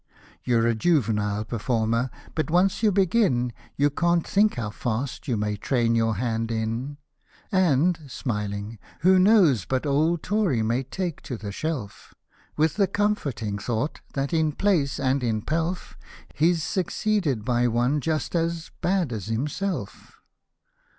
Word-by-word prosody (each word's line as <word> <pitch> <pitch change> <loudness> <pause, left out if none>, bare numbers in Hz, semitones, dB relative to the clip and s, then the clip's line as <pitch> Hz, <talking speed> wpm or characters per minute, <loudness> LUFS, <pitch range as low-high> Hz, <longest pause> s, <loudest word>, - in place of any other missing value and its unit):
You're 115 -2 +2
a 115 - +3
juvenile 110 -6 +1
performer, 115 +2 0 0.2
but 155 0 -2
once 185 +5 +2
you 215 -2 +4
begin, 185 - +2 0.2
You 145 +1 +3
can't 170 +2 +1
think 210 +2 +3
how 110 -4 -3
fast 120 +5 -3
you 120 -4 0
may 105 0 -1
train 115 +1 +1
your 115 -1 +2
hand 115 0 -1
in: 115 +5 -3 0.5
And 175 -2 +3
{smilijig) 105 -4 -4 0.2
who 185 +2 +5
knows 185 - +5
but 130 +2 -1
old 155 +4 +1
Tory 190 - +1
may 115 +4 +1
take 170 +5 -4
to 125 - -5
the 105 -2 -6
shelf. 130 -4 -5 0.4
With 155 +3 +2
the 200 -2 +3
comforting 140 - -1
thought 115 +7 -2
that, 140 +3 -1
in 160 -2 +2
place 155 -8 +1
and 135 0 +1
in 110 -3 0
pelf. 165 +3 -2 0.4
He's 165 +1 +2
succeeded 180 - -1
by 120 -1 +2
one 120 +5 +1
just 155 +3 -2
as 165 -1 -1
— - - -37
bad 180 -8 +1
as 105 -2 -5
himself? 145 - -4
140 Hz, 145 wpm, -25 LUFS, 115-170 Hz, 0.5 s, who